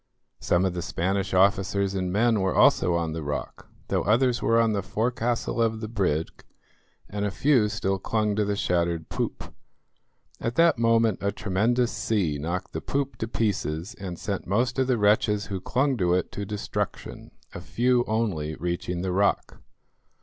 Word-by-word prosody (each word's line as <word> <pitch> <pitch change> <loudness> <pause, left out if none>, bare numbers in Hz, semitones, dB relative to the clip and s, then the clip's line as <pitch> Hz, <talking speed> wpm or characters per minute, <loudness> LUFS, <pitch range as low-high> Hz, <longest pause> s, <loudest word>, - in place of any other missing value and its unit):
Some 90 +2 +1
of 95 - 0
the 90 - -3
Spanish 95 +2 -1
officers 100 0 +2
and 90 -2 -2
men 110 +2 +2
were 95 -1 0
also 85 - +4
on 85 -2 -1
the 80 - -4
rock, 75 -1 -5 0.2
though - - +1
others 120 +3 +2
were 115 0 +3
on 115 -1 +3
the 100 - 0
forecastle 115 +4 -1
of 115 -1 +1
the 110 - -5
brig, 90 -8 -2 0.6
and 100 0 -4
a 105 - +1
few 120 0 +2
still 95 -2 -1
clung 105 +1 0
to 105 - +1
the 100 0 -1
shattered 85 -4 -1
poop. - - -4 0.9
At 115 +1 -3
that 165 -5 +4
moment 115 -3 +3
a 100 - 0
tremendous 110 +5 0
sea 100 -9 -1
knocked 90 +5 -4
the - - -3
poop 140 0 -2
to 110 - -2
pieces 100 -5 -2
and 95 -6 -7
sent 100 +1 -4
most 120 +8 0
of 130 - +2
the 125 -2 +2
wretches 105 0 +2
who 95 - -3
clung 135 +5 +1
to 90 -3 +2
it 90 - -1
to 100 - -5
destruction, 105 0 -4 0.2
a - - -7
few 125 0 +1
only 95 -9 -1
reaching 85 +1 -3
the 95 - -1
rock. 100 +2 0
100 Hz, 175 wpm, -26 LUFS, 90-115 Hz, 0.9 s, also